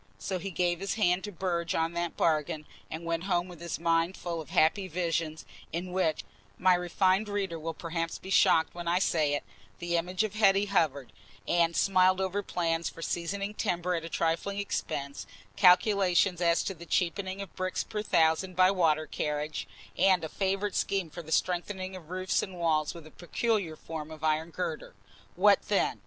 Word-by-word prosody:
So 185 -2 -3
he 195 +3 -5
gave 175 -1 0
his 195 0 -2
hand 185 -4 +2
to 205 - -6
Burge 170 -2 -2
on 165 +1 0
that 170 -1 -3
bargain, 155 -1 0 0.2
and 165 +1 -6
went 165 +1 -2
home 175 -2 +1
with 175 -3 -12
his 170 -2 -3
mind 165 +2 +1
full 170 -2 -4
of 150 - -12
happy 185 +5 +3
visions, 165 -2 -2 0.3
in 180 +2 -4
which 180 -4 0 0.3
(my 185 0 +5
refined 185 +3 +1
reader 195 -5 -2
will 165 +1 -4
perhaps 165 0 -3
be 190 - -9
shocked 160 -3 +4
when 175 -1 -6
I 175 +1 +3
say 155 -6 +2
it) 145 - -3 0.3
the 170 0 -1
image 180 +4 0
of 215 -2 -3
Hetty 200 -2 +4
hovered, 155 - 0 0.3
and 170 -1 +2
smiled 185 +2 +4
over 190 +1 -1
plans 170 -3 -1
for 165 - -9
seasoning 200 +5 -2
timber 180 -4 -1
at 165 -2 -2
a 165 - -6
trifling 165 +5 -1
expense, 140 -8 -3 0.3
calculations 185 -1 +4
as 170 -1 +3
to 195 - -3
the 170 -1 -12
cheapening 185 +3 -1
of 200 - -8
bricks 185 0 -2
per 215 -2 -4
thousand 170 -1 +2
by 185 +1 +5
water 160 -5 +2
carriage, 150 0 -3 0.3
and 185 -1 +4
a 160 - -3
favourite 195 +2 -1
scheme 190 -5 -1
for 175 - -7
the 160 -1 -11
strengthening 185 +2 -1
of 170 -4 -11
roofs 185 +1 0
and 190 -2 -6
walls 160 -2 +1
with 165 -2 -10
a 155 - -13
peculiar 190 -1 -1
form 155 -1 -7
of 155 -1 -10
iron 155 +1 +1
girder. 165 -2 -5 0.4
What - - +5
then? - - +1
175 Hz, 185 wpm, -29 LUFS, 165-190 Hz, 0.4 s, my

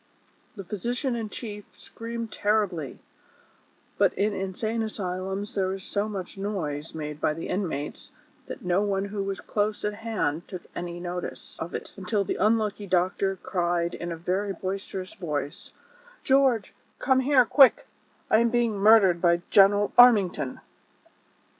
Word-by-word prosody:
The 200 - -7
physician 240 - -2
in 225 -2 -4
chief 210 -2 -8
screamed 230 -1 -6
terribly, 200 -9 0 1.0
but - - +5
in 210 +1 +1
insane 210 +4 -2
asylums 195 -1 -3
there 190 -2 0
is 195 -1 -7
so 205 +2 -2
much 195 -2 -6
noise 165 -8 -4
made 150 -1 -6
by 150 - +1
the 165 - -6
inmates 160 -7 -3 0.4
that - - -8
no 180 +2 +2
one 200 -1 0
who 200 -2 -1
was 195 0 -3
close 210 0 -1
at 210 - -1
hand 210 -8 -2
took 185 -3 -7
any 175 0 -5
notice 180 0 -6
of 170 - -5
it; - - -6
until 200 +2 0
the - - -2
unlucky 215 0 +1
doctor 185 +2 +1
cried 175 -2 -1
in 170 0 -5
a 165 - -4
very 190 +4 -1
boisterous 190 0 -5
voice: 150 -6 -4 0.6
''George, 265 -6 +3 0.3
come 260 0 +2
here, 260 -1 +4
quick; 270 +3 +6 0.5
I 220 - +6
am 235 0 +3
being 235 -2 +1
murdered 200 -5 +6
by 170 0 +3
General 205 +1 +5
Armington." 205 - +5
195 Hz, 145 wpm, -26 LUFS, 180-215 Hz, 1.0 s, quick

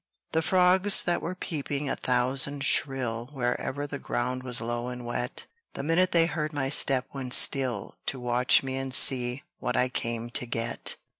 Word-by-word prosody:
The 160 - +1
frogs 185 +3 +4
that 175 -1 0
were 180 +2 -5
peeping 145 -4 -4
a - - -1
thousand 130 +3 0
shrill 125 -4 0
Wherever 130 +2 -3
the 145 -1 -7
ground 125 +1 -3
was 125 -1 0
low 120 +1 -4
and 125 -1 -7
wet, 120 +1 -4 0.3
The 140 - -5
minute 170 +4 +1
they 165 -1 +4
heard 155 -2 -4
my 135 -2 -2
step 135 -2 +4
went 130 -3 +2
still 125 -7 +2
To 135 - -2
watch 125 +2 +3
me 130 0 -4
and 135 0 -4
see 125 +1 +3 0.2
what 125 - -2
I 125 - +2
came 115 -1 -4
to 125 - -1
get. 115 0 -1
130 Hz, 175 wpm, -26 LUFS, 125-145 Hz, 0.3 s, frogs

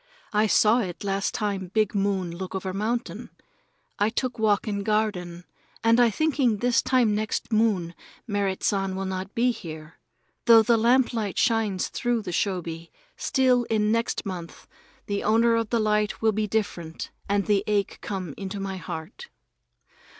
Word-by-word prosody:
I 210 +1 +3
saw 215 +3 +4
it 185 -6 -4
last 195 0 -1
time 200 -4 -2
big 215 -2 +2
moon 195 -4 -1
look 185 +1 -6
over 190 0 -3
mountain. 225 +5 -3 0.7
I 205 +1 +3
took 245 +1 -3
walk 215 0 +2
in 200 -1 -1
garden 200 -5 -1 0.4
and 230 +1 +4
I 240 -1 +6
thinking 265 -3 +1
this 240 +2 +2
time 245 -5 +2
next 215 +2 -2
moon 205 -6 +1 0.3
Merrit 200 -4 -1
San 195 -2 0
will 195 0 -3
not 190 +1 -5
be 245 +2 +3
here. 160 -7 -9 0.5
Though 230 -2 +8
the 235 +2 +4
lamplight 230 -3 +2
shines 215 -5 +1
through 240 -3 -1
the 180 - -5
shoji, 170 -3 -2 0.2
still 255 -2 +2
in 215 -1 +1
next 230 0 -1
month 180 -4 -7 0.4
the 200 -1 -2
owner 230 +2 +4
of 230 -2 -1
the 235 - +1
light 210 -1 +1
will 220 0 +3
be 215 0 -1
different 175 -7 -3 0.2
and 200 0 +1
the 205 -2 +2
ache 205 -2 0
come 185 -6 -4
into 195 0 -5
my 195 -1 -4
heart. 160 -2 -7
210 Hz, 160 wpm, -25 LUFS, 190-225 Hz, 0.7 s, Though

